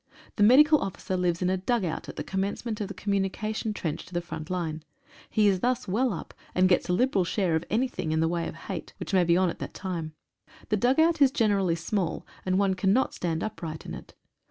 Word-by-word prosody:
The - - -2
medical 295 +8 +7
officer 190 -1 -3
lives 180 -1 0
in 180 - +2
a 190 - +1
dugout 190 -3 -1
at - - -8
the - - -4
commencement 205 +3 -3
of 205 - -2
the 205 - -8
communication 205 +2 -1
trench 165 -6 -3
to 180 - -11
the - - +2
front 160 -3 -7
line. 165 -4 -2 0.5
He 215 -1 +3
is 190 -2 +3
thus 250 +3 0
well 235 +7 +1
up, 175 - -6 0.2
and 185 +1 +5
gets 180 0 +2
a - - +3
liberal 220 -2 +2
share 175 -1 0
of 160 - 0
anything 230 -8 -1
in 160 - +1
the 160 - +3
way 170 0 -1
of - - -7
hate, 180 -5 -6
which - - -6
may 185 -2 +5
be 170 0 +3
on 185 -2 +3
at - - -11
that - - -6
time. 170 -5 -4 0.5
The 215 - +2
dugout 310 +9 +3
is 275 - +8
generally 205 - +2
small, 170 +1 -2 0.2
and 185 0 +2
one 195 -1 +3
cannot 195 +7 +2
stand 165 -2 -2
upright 170 -8 -5
in - - -6
it. - - -10
190 Hz, 225 wpm, -27 LUFS, 175-215 Hz, 0.5 s, is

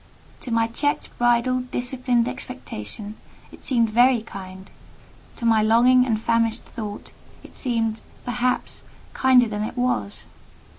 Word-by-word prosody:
To - - -8
my 230 -1 +2
checked, 290 +6 -2
bridled, 245 +1 +2
disciplined 245 -1 0
expectation, 210 - -7 0.3
it - - -14
seemed 230 -4 +1
very 240 0 +4
kind: 190 -3 -10 0.6
to 235 - -6
my 225 -2 +4
longing 245 +4 +5
and 220 -3 +1
famished 230 0 +1
thought 210 -3 -7 0.3
it - - -14
seemed, 225 -4 -1 0.2
perhaps, 245 0 -1 0.3
kinder 255 -2 +5
than 210 -1 -4
it 220 +4 -4
was. 245 - -1
235 Hz, 130 wpm, -23 LUFS, 220-250 Hz, 0.6 s, longing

